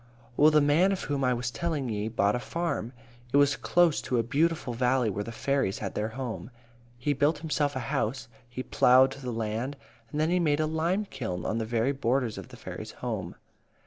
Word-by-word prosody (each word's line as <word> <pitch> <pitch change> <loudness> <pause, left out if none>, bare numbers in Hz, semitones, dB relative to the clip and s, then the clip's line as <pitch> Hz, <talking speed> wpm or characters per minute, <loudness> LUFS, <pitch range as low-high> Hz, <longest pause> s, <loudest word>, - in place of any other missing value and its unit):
"Well, 150 +4 +6
the 155 -1 +4
man 155 +7 +4
of 195 - -2
whom 140 -2 -1
I 125 -1 +3
was 120 0 -3
tellin' 150 +1 -2
ye 105 -2 -2
bought 105 -2 +1
a - - -1
farm. 165 -5 -3 0.4
It 140 - +3
was 145 -1 +5
close 175 -3 +2
to 125 - -1
a 115 - +2
beautiful 150 +1 0
valley 125 -1 +2
where 105 +2 -3
the 115 - -7
fairies 135 -4 0
had - - -4
their 105 - -1
home. 125 -3 -5 0.5
He 145 +4 0
built 145 +4 +2
himself 150 -2 -1
a - - -1
house; 115 +1 -2 0.2
he 125 +1 -5
ploughed 130 +2 +5
the 135 -2 -6
land; 115 +5 -3 0.3
and 150 - -3
then 155 +2 +2
he 180 - +3
made 150 -3 +2
a 155 - +2
lime 165 +6 0
kiln 110 - -5
on 110 - -1
the 110 - -1
very 115 +3 +1
borders 125 -3 0
of - - -9
the - - -13
fairies' - - -8
home. - - -3
130 Hz, 210 wpm, -28 LUFS, 115-150 Hz, 0.5 s, Well